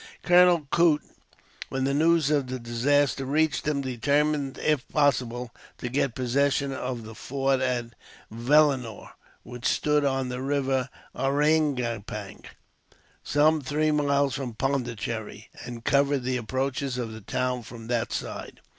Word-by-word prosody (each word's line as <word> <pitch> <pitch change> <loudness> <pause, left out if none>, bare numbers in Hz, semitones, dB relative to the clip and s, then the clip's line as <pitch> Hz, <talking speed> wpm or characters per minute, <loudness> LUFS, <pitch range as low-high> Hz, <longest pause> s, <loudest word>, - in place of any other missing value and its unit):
Colonel 175 -3 +5
Coote, 165 -3 +4 0.7
when 135 0 -2
the 135 +1 +1
news 160 0 +3
of 145 -3 +1
the 130 0 -4
disaster 130 +4 +1
reached 150 +3 0
him, 145 -2 +1
determined, 140 +2 0
if 150 -3 0
possible, 125 -5 0 0.2
to 125 - -5
get 130 -1 0
possession 140 +2 +1
of 125 -3 -4
the 110 +1 -9
fort 135 +3 -1
of 125 -2 -1 0.4
Vellenore, 125 -1 +2 0.3
which 125 0 -5
stood 150 -1 +2
on 135 -2 0
the 125 0 -4
river 135 -1 0 0.3
Ariangopang, 135 -8 0 0.8
some 155 +2 +3
three 150 +3 0
miles 140 -2 +2
from 130 -4 -4
Pondicherry, 115 -5 -3 0.2
and 120 -1 -8
covered 140 -1 +2
the 130 0 0
approaches 130 +2 -2
of 120 -3 -3
the 110 - -9
town 125 +4 -2
from 115 0 -10
that 120 -1 -1
side. - - -5
135 Hz, 135 wpm, -26 LUFS, 120-145 Hz, 0.8 s, Colonel